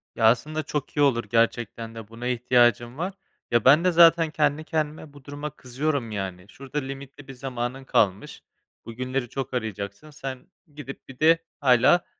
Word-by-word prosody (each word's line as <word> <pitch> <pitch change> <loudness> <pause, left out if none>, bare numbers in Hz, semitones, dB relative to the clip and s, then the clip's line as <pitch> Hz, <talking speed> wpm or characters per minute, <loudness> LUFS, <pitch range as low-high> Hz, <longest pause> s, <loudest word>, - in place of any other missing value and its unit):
Ya, 115 - +1
aslında, 150 +8 +2
çok 150 -2 -4
iyi 145 - +3
olur 125 -5 +3
gerçekten 115 0 0
de 110 -2 -8
buna 115 +2 -7
ihtiyacım 120 0 +2
var, 180 +5 -3 0.4
ya, 120 -1 +2
bende, 160 +7 +6
zaten, 165 -1 +6
kendi 150 0 +1
kendime 155 -1 -3
bu 145 -2 -15
duruma 145 +1 -5
kızıyorum, 130 -2 -3
yani, 95 -3 -5
"Şurada 135 +4 -8
limitli 135 0 -8
bir 135 - -8
zamanın 125 0 -4
kalmış. 100 -6 0 0.4
Bugünleri 125 +1 -3
çok 135 -1 -5
arayacaksın 110 +3 -4
sen 130 -3 -7 0.3
gidip 140 -2 -9
bir 130 - -12
de 165 +2 +6 0.2
hâlâ, 130 +5 +4
130 Hz, 160 wpm, -25 LUFS, 120-150 Hz, 0.4 s, bende